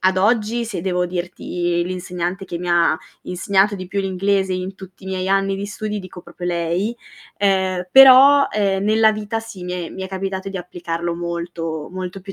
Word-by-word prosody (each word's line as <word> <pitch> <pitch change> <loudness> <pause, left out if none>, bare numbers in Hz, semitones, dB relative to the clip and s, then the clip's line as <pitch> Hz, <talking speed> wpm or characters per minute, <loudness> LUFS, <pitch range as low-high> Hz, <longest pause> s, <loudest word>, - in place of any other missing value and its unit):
ad 185 0 +2
oggi 225 +3 +1
se 210 -6 -4
devo 180 -1 0
dirti 175 -1 -2
l'insegnante 180 +1 -4
che 175 -2 -5
mi 180 - -5
ha 170 -2 +3 0.3
insegnato 195 +3 +1
di 185 - -7
più 200 +2 -2
l'inglese 195 0 0
in 185 +1 -4
tutti 190 0 -13
i - - -9
miei 190 0 -2
anni 195 0 +2
di 200 +1 -4
studi, 210 0 -4
dico 185 -1 -10
proprio 175 +1 -8
lei. 175 +6 -1 0.4
Ehm, 190 -2 +1
però, 270 +2 +9
uhm, 195 -2 +1
nella 220 +1 +4
vita 215 +1 -3
sì 225 -5 -10
mi 180 - -4
è 180 -2 -4
mi 190 - -7
è 190 - -5
capitato 190 0 -4
di 195 - -6
applicarlo 170 -1 -4
molto, 170 -2 -4
molto 185 +1 -6
più 195 +1 -9
190 Hz, 190 wpm, -20 LUFS, 175-200 Hz, 0.4 s, però